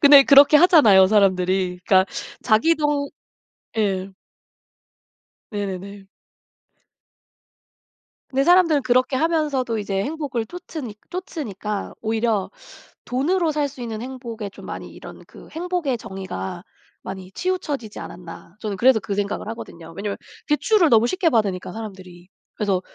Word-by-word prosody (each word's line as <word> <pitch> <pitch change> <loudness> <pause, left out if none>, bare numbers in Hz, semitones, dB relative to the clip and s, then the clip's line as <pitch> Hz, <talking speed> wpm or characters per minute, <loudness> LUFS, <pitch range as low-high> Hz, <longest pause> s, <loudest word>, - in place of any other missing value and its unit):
근데 285 -1 +9
그렇게 280 +2 +7
하잖아요 285 - +7
사람들이. 185 -2 +2
그러니까 190 -1 +5 0.4
자기도 290 +4 +2 0.7
예. 195 -3 0 1.4
네네네. 200 -1 -5 2.2
근데 270 +1 +1
사람들은 335 -5 +5
그렇게 255 +1 +2
하면서도 290 -7 0
이제 195 -2 -2
행복을 275 -4 -3
좇으니 315 - -7 0.2
좇으니까 220 - -5
오히려 220 -2 0 0.6
돈으로 320 +7 +1
살 295 -1 0
수 265 -2 -11
있는 225 -2 -5
행복에 235 -5 -6
좀 - - -13
많이 - - -7
이런 - - -11
그 - - -15
행복의 330 -6 -2
정의가 190 -2 -6 0.4
많이 190 0 -8
치우쳐지지 295 - -3
않았나. 175 +1 -10
저는 210 -3 -4
그래서 245 +1 +5
그 200 - -4
생각을 205 +1 -2
하거든요 170 -7 -9
왜냐하면 200 0 -4 0.3
대출을 350 +3 +3
너무 230 -1 +5
쉽게 370 0 +1
받으니까 195 -7 0
사람들이. 185 -5 -9 0.3
그래서 195 -4 0
225 Hz, 310 characters per minute, -22 LUFS, 195-295 Hz, 2.2 s, 근데